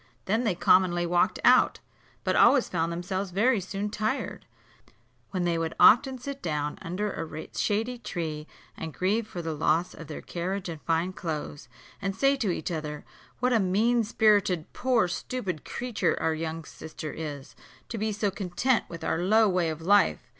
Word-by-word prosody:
Then 220 +5 +1
they 200 -5 +1
commonly 175 -1 +3
walked 175 0 +2
out; - - +5 0.4
but - - +1
always 270 -4 +5
found 165 +1 -1
themselves 185 +3 -3
very 215 +6 +2
soon 195 +2 -4
tired; 215 +6 -3 0.8
when 185 -2 -2
they 170 -1 +1
would 165 -1 -3
often 260 +3 +6
sit 275 +2 -7
down 150 -3 -2
under 195 +5 -3
a 155 -1 -6
shady 225 +4 -1
tree, 155 -7 -4 0.3
and 160 -2 -7
grieve 210 +4 0
for 175 -4 -6
the 160 -1 -2
loss 160 +3 +1
of 165 - -10
their - - -7
carriage 185 +2 -3
and 160 -3 -7
fine 165 +3 0
clothes, 155 -4 -5 0.3
and 195 -1 -2
say 275 +4 +3
to 225 -7 -1
each 170 -1 -2
other, 150 -2 -5 0.4
"What 250 0 +2
a 230 - +4
mean 220 +5 +2
spirited 205 -6 +2
poor 250 -6 +2
stupid 180 - -4
creature 245 -3 -1
our 160 - +1
young 160 +1 -4
sister 155 0 -8
is, 145 -3 -7 0.3
to 230 - -4
be 215 +1 0
so 205 -1 -1
content 195 +6 0
with 170 -1 -8
our 160 0 0
low 215 +5 +4
way 180 -3 +1
of 160 0 -5
life!" 200 +3 +3
185 Hz, 175 wpm, -27 LUFS, 165-215 Hz, 0.8 s, often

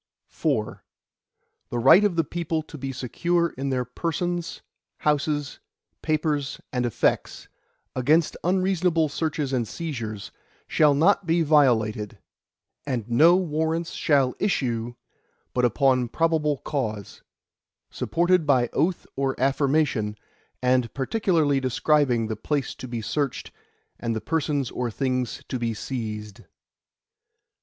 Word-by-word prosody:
IV - - -1 0.9
The 120 - -3
right 135 - +7
of 205 -4 +2
the 165 - +2
people 160 0 -3
to 155 - -12
be 135 -2 -4
secure 170 +7 0
in 135 -1 -4
their 130 -2 0
persons, 170 +6 -3 0.3
houses, 150 -1 -1 0.4
papers, 150 -3 -1
and 125 -1 0
effects, 115 - -1 0.5
against 150 +6 +2
unreasonable 180 -3 +2
searches 150 -2 -2
and 120 -3 0
seizures, 115 - -5 0.4
shall 150 -2 +4
not 180 +5 +3
be 165 +1 +3
violated, 115 -9 +2 0.7
and 125 -6 -3
no 160 +9 +6
Warrants 165 -1 -1
shall 140 -4 +2
issue, 120 - -1 0.6
but 125 -1 +2
upon 125 +1 +2
probable 155 +1 +1
cause, 110 -9 -4 0.7
supported 175 -1 +1
by 125 -4 +3
oath 170 +5 0
or 135 -1 -1
affirmation, 135 -5 +1 0.5
and 125 -1 +2
particularly 155 -2 +1
describing 130 -2 +2
the 110 0 -3
place 140 +5 -2
to 130 - -9
be 120 -2 -4
searched, 140 +3 -2 0.5
and 115 -1 -2
the - - -1
persons 145 -2 -1
or 125 -1 -2
things 125 0 -2
to 130 - -3
be 115 -1 -1
seized. 105 -4 -5
140 Hz, 120 wpm, -25 LUFS, 125-160 Hz, 0.9 s, right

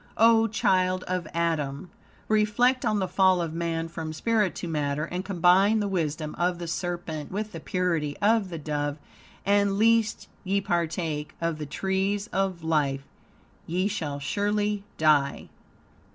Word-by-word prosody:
O 225 0 +5
child 185 -3 +1
of 180 -3 -3
Adam! 165 -2 -2 0.4
Reflect 215 +5 +2
on 215 -2 +2
the 190 -2 0
fall 190 -1 +3
of 165 -2 -2
man 165 -1 -2
from 165 -1 -6
spirit 215 +2 +1
to 175 - -5
matter, 150 -1 -1
and 180 +2 -4
combine 195 +3 +4
the 205 - 0
wisdom 155 -5 -2
of 175 0 +1
the 175 - -5
serpent 170 -3 -4
with 210 +2 -3
the 165 - -7
purity 165 -4 -1
of 210 -1 +2
the 170 - -5
dove, 145 -1 -2 0.5
and 200 0 +3
"lest 225 0 +2 0.2
ye 200 0 +1
partake 165 -5 -2
of 165 -2 -2
the 150 - -5
tree 190 +5 0
of 190 -3 -1
life 145 -4 0 0.6
ye 180 +4 0
shall 155 -8 -3
surely 205 +6 -1
die." 150 -3 +2
180 Hz, 150 wpm, -26 LUFS, 160-200 Hz, 0.6 s, O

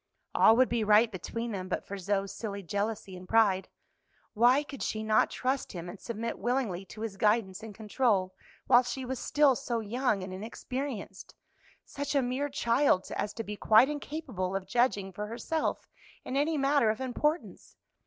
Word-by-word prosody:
"All 225 - +6
would 255 +2 +5
be 235 -1 0
right 215 +2 +5
between 230 +5 -4
them 185 -3 -4
but - - -2
for 200 - -6
Zoe's 195 +1 -1
silly 200 -3 -5
jealousy 200 +1 -3
and 180 0 -11
pride. 205 -4 +3 0.6
Why 245 +6 +4
could 280 -3 -9
she 215 0 -2
not 215 0 +3
trust 260 +1 -2
him 175 -1 -6
and 180 +3 -8
submit 230 0 -4
willingly 235 -7 -1
to 215 - -11
his 220 -3 -4
guidance 210 -2 +1
and 220 -2 -9
control 210 -4 0 0.3
while 245 - +6
she 255 +1 -5
was 255 0 -4
still 290 -3 +3
so 240 -2 -2
young 220 -2 -1
and 185 0 -6
inexperienced 225 +1 -6 0.5
such 285 +1 -4
a 275 - +3
mere 260 +4 -1
child 250 -6 +2
as 210 - -2
to 225 - -4
be 210 -1 -6
quite 220 +5 +5
incapable 270 - -4
of 195 -1 -2
judging 200 -3 +1
for 210 +3 -5
herself 275 +8 -2 0.4
in 260 - -4
any 300 +3 +1
matter 275 -4 +3
of 215 - -1
importance? 300 +5 -2
225 Hz, 175 wpm, -30 LUFS, 200-260 Hz, 0.6 s, All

